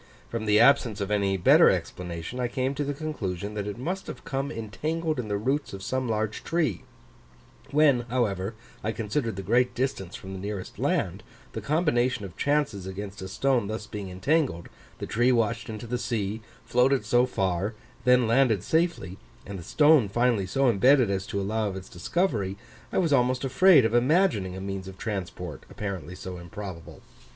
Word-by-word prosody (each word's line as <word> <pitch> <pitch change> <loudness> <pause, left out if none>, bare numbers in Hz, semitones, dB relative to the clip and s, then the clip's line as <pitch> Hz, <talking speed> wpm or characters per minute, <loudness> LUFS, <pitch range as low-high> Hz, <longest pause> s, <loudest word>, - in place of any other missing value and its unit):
From 115 -2 -3
the 105 0 +5
absence 120 -4 +4
of 100 0 -3
any 100 -2 +1
better 90 - +6
explanation, 90 +6 -3
I 125 - +1
came 130 +2 -1
to 145 - -2
the 145 0 -3
conclusion 105 - -4
that 105 -1 -3
it 105 - -5
must 180 +10 -4
have - - -8
come 135 0 -2
entangled 155 +7 -3
in 120 - -3
the 100 -1 -1
roots 135 +6 -1
of 95 0 -7
some 130 +3 -2
large 110 -1 -2
tree: 155 - 0 0.9
when, 145 -3 +4
however, 105 -4 -1 0.3
I 110 - -1
considered 115 +1 -2
the 95 - -5
great 125 +6 +2
distance 120 -8 -2
from 95 0 -8
the 95 - -6
nearest 100 -1 -6
land, - - 0 0.3
the - - -4
combination 130 - +1
of 90 - -10
chances 140 -10 0
against 100 +1 -6
a 95 - -5
stone 125 +2 +1
thus 110 0 -4
being 105 -2 -6
entangled, 95 - 0 0.3
the - - -5
tree 120 +3 +2
washed 115 0 0
into 110 +1 -6
the 120 +1 -2
sea, 110 -2 -2 0.2
floated 125 -1 +2
so 120 +3 +3
far, 95 -1 -1 0.3
then 125 -1 +5
landed 115 -4 +3
safely, 160 - 0 0.3
and 100 -1 -6
the - - -9
stone 145 - +4
finally 120 -3 +1
so 135 +8 +2
embedded 125 +1 +4
as 95 0 -2
to 100 - -2
allow 110 +2 -1
of 95 - -4
its 95 0 -7
discovery, 100 - -1 0.3
I - - -2
was 165 -6 +2
almost 125 -1 +2
afraid 135 +1 +6
of 115 - 0
imagining 120 - +2
a 95 - -6
means 95 -1 -5
of 95 0 -9
transport 90 -7 -5
apparently 90 -5 -5
so 90 -1 -7
improbable. 85 0 -9
110 Hz, 180 wpm, -27 LUFS, 95-130 Hz, 0.9 s, better